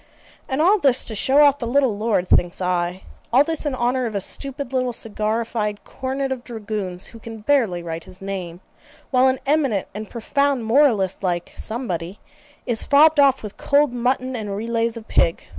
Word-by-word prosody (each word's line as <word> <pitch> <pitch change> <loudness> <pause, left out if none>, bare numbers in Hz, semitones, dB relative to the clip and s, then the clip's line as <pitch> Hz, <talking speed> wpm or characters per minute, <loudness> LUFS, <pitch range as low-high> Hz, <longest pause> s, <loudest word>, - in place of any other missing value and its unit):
And 275 +3 +1
all 400 +5 +5
this 270 -6 +2
to 225 - -5
show 265 +7 +3
off 285 -1 +4
the 235 - -3
little 260 -3 +2
lord, 210 -4 0
thinks 175 -1 +2
I. 180 0 -1 0.3
All 260 +4 +6
this 320 -1 -2
in 275 - -1
honour 250 0 0
of 215 - -6
a - - +1
stupid 275 +6 -3
little 255 -1 0
cigarrified 215 -1 -2
Cornet 265 +1 -4
of 255 -2 -4
dragoons, 210 -6 -5
who 230 - -11
can 225 -1 -9
barely 215 -9 +1
write 165 -1 -6
his 185 0 -15
name, 185 -3 -6 0.5
while 255 0 +4
an 260 0 +2
eminent 275 -9 +1
and 210 +1 -7
profound 275 +1 0
moralist 225 -6 +3
like 175 -3 -2
somebody 195 -6 -4 0.5
is 235 -3 0
fobbed 300 +2 +5
off 275 -3 +4
with 210 -1 -8
cold 285 -2 +2
mutton 255 +1 -1
and 210 -4 -4
relays 230 +2 -1
of 225 - -10
pig. 165 - +1
230 Hz, 180 wpm, -22 LUFS, 200-265 Hz, 0.5 s, All